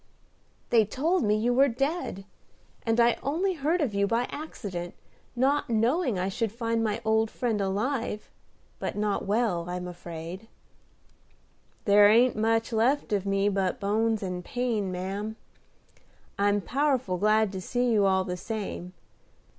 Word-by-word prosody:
"They 230 Hz, -2 st, +6 dB
told 300 Hz, -, 0 dB
me 210 Hz, -2 st, +2 dB
you 230 Hz, +3 st, +1 dB
were 270 Hz, +3 st, +5 dB
dead, 275 Hz, -, -2 dB, 0.6 s
and 225 Hz, +1 st, +2 dB
I 235 Hz, 0 st, +4 dB
only 350 Hz, +7 st, 0 dB
heard 325 Hz, +2 st, 0 dB
of 260 Hz, -8 st, 0 dB
you 200 Hz, 0 st, +1 dB
by 230 Hz, +3 st, +1 dB
accident, 195 Hz, -, -6 dB, 0.4 s
not 275 Hz, +3 st, +1 dB
knowing 240 Hz, -, +1 dB
I 180 Hz, +1 st, -1 dB
should 220 Hz, +2 st, -2 dB
find 230 Hz, 0 st, -1 dB
my 215 Hz, 0 st, -1 dB
old 220 Hz, 0 st, +2 dB
friend 225 Hz, -4 st, -1 dB
alive, 210 Hz, +3 st, -2 dB, 0.5 s
but -, -, -3 dB
not 205 Hz, -1 st, -1 dB
well, 200 Hz, -5 st, 0 dB
I'm 180 Hz, 0 st, -4 dB
afraid?" 175 Hz, +3 st, -8 dB, 1.4 s
"There 205 Hz, 0 st, +7 dB
ain't 240 Hz, +4 st, +5 dB
much 225 Hz, +2 st, +1 dB
left 235 Hz, +2 st, +1 dB
of 200 Hz, -1 st, 0 dB
me 195 Hz, 0 st, +2 dB
but 195 Hz, -2 st, 0 dB
bones 220 Hz, +1 st, 0 dB
and 180 Hz, -1 st, -4 dB
pain, 230 Hz, -5 st, -1 dB
ma'am. 195 Hz, +4 st, -4 dB, 1.0 s
I'm 205 Hz, 0 st, +2 dB
powerful 255 Hz, -, 0 dB
glad 215 Hz, 0 st, +3 dB
to 190 Hz, -1 st, -5 dB
see 245 Hz, +6 st, 0 dB
you 205 Hz, -3 st, +4 dB
all 190 Hz, 0 st, +2 dB
the 180 Hz, -1 st, -4 dB
same. 190 Hz, -2 st, -5 dB
220 Hz, 145 wpm, -27 LUFS, 195-245 Hz, 1.4 s, There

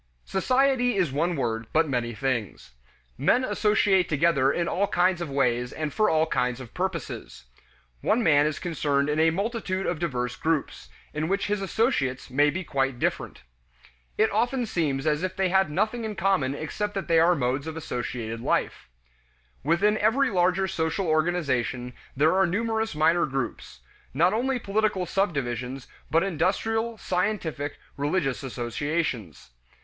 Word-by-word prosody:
Society 255 Hz, +3 st, +2 dB
is 180 Hz, -8 st, +1 dB
one 165 Hz, +6 st, 0 dB
word, 115 Hz, -4 st, -2 dB
but 160 Hz, +1 st, +3 dB
many 120 Hz, -4 st, -2 dB
things. 120 Hz, -, -3 dB, 0.5 s
Men 240 Hz, -, +3 dB
associate 210 Hz, -4 st, +2 dB
together 150 Hz, -3 st, +3 dB
in 170 Hz, +2 st, -1 dB
all 200 Hz, +4 st, +1 dB
kinds 180 Hz, -1 st, +2 dB
of 170 Hz, -, -3 dB
ways 125 Hz, -3 st, 0 dB
and 155 Hz, -2 st, -4 dB
for 215 Hz, -, +3 dB
all 160 Hz, 0 st, +3 dB
kinds 125 Hz, -5 st, -1 dB
of 125 Hz, -3 st, -10 dB
purposes. 180 Hz, -, -4 dB, 0.6 s
One 235 Hz, +2 st, +2 dB
man 145 Hz, -4 st, +4 dB
is 155 Hz, -, -2 dB
concerned 145 Hz, -4 st, 0 dB
in 150 Hz, +1 st, 0 dB
a 160 Hz, +1 st, +5 dB
multitude 195 Hz, +1 st, -2 dB
of 175 Hz, -, -1 dB
diverse 125 Hz, -7 st, -2 dB
groups, 160 Hz, -1 st, -2 dB, 0.2 s
in 155 Hz, +1 st, -2 dB
which 195 Hz, +2 st, 0 dB
his 205 Hz, -1 st, -1 dB
associates 180 Hz, -, 0 dB
may 145 Hz, +3 st, +4 dB
be 185 Hz, +6 st, -3 dB
quite 135 Hz, -5 st, -1 dB
different. -, -, -2 dB, 0.7 s
It 220 Hz, -, +3 dB
often 240 Hz, +4 st, +1 dB
seems 150 Hz, -10 st, -1 dB
as 150 Hz, 0 st, +1 dB
if 185 Hz, 0 st, -3 dB
they 190 Hz, -1 st, +1 dB
had 190 Hz, -2 st, +3 dB
nothing 215 Hz, +9 st, -1 dB
in 215 Hz, -1 st, -4 dB
common 170 Hz, -8 st, +1 dB
except 205 Hz, +7 st, -4 dB
that 195 Hz, -, -3 dB
they 165 Hz, -1 st, +4 dB
are 175 Hz, +2 st, +5 dB
modes 135 Hz, +1 st, -1 dB
of 160 Hz, 0 st, -5 dB
associated 120 Hz, -6 st, -4 dB
life. -, -, -1 dB, 0.7 s
Within 200 Hz, +8 st, +2 dB
every 240 Hz, +5 st, +2 dB
larger 185 Hz, +1 st, +2 dB
social 165 Hz, +2 st, -1 dB
organization 145 Hz, -7 st, 0 dB, 0.2 s
there 155 Hz, +4 st, +4 dB
are 190 Hz, -1 st, +4 dB
numerous 220 Hz, +1 st, -1 dB
minor 165 Hz, +2 st, +3 dB
groups: 135 Hz, -3 st, -5 dB, 0.3 s
not 170 Hz, +7 st, +3 dB
only 255 Hz, +4 st, 0 dB
political 210 Hz, -4 st, 0 dB
subdivisions, 135 Hz, -, -2 dB, 0.2 s
but 165 Hz, +3 st, +3 dB
industrial, 220 Hz, +6 st, 0 dB
scientific, 180 Hz, -8 st, -2 dB, 0.2 s
religious, 145 Hz, -1 st, 0 dB
associations. 120 Hz, -, -3 dB
165 Hz, 155 wpm, -26 LUFS, 135-195 Hz, 0.7 s, a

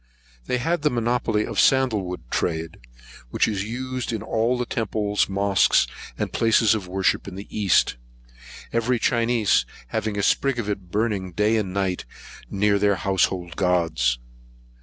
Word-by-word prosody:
They 125 Hz, -, +1 dB
had 165 Hz, +7 st, -1 dB
the 150 Hz, -, +3 dB
monopoly 120 Hz, -3 st, 0 dB
of -, -, -6 dB
the -, -, +6 dB
sandlewood 110 Hz, -9 st, +2 dB
trade, 80 Hz, -1 st, -2 dB, 0.5 s
which -, -, +1 dB
is 100 Hz, -3 st, -1 dB
used 130 Hz, +3 st, -4 dB
in 110 Hz, -2 st, -3 dB
all 120 Hz, +3 st, 0 dB
temples, 105 Hz, -4 st, -1 dB
mosques, 100 Hz, 0 st, +3 dB, 0.3 s
and -, -, -3 dB
places 115 Hz, -1 st, +4 dB
of 105 Hz, -4 st, -3 dB
worship 95 Hz, +2 st, 0 dB
in 95 Hz, -, -7 dB
the 100 Hz, +2 st, -7 dB
East, 100 Hz, -11 st, +2 dB, 0.8 s
every 115 Hz, +2 st, +1 dB
Chinese 115 Hz, -4 st, +2 dB, 0.3 s
having 110 Hz, +6 st, -2 dB
a 100 Hz, -, 0 dB
sprig 135 Hz, +4 st, +2 dB
of 115 Hz, -3 st, -3 dB
it 100 Hz, -3 st, -4 dB
burning 100 Hz, -3 st, -1 dB
day 105 Hz, +5 st, +2 dB
and 105 Hz, -4 st, -1 dB
night 95 Hz, -4 st, -1 dB, 0.4 s
near 100 Hz, 0 st, +2 dB
their 100 Hz, 0 st, +3 dB
household 95 Hz, -1 st, 0 dB
gods. 80 Hz, -9 st, +1 dB
105 Hz, 150 wpm, -23 LUFS, 95-115 Hz, 0.8 s, the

